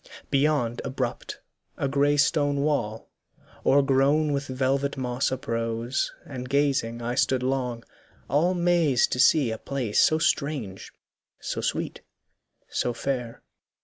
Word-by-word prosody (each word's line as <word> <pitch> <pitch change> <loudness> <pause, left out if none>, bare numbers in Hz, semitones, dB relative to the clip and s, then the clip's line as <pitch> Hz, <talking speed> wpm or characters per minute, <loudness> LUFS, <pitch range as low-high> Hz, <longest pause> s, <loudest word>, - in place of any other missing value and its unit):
Beyond, 135 -4 +1
abrupt, 130 -2 -4 0.4
A 140 - -1
grey 140 +2 +2
stone 145 -1 +2
wall. 120 -7 -2 0.5
o'ergrown 140 +2 +3
with 140 0 -2
velvet 135 +2 -1
moss 130 +1 -1
Uprose; 115 +1 -2
and 130 -5 -7
gazing 135 -5 0
I 120 +1 -2
stood 130 0 +1
long, 125 -3 -2 0.4
all 170 +6 +2
mazed 170 -7 +2
To 125 - -1
see 140 -3 +4
a 110 - -5
place 130 -7 -1
so 155 - +4
strange, 140 - -1 0.5
so - - -4
sweet, - - -3 0.7
so 120 - -1
fair. 125 -2 -4
135 Hz, 120 wpm, -26 LUFS, 120-145 Hz, 0.7 s, see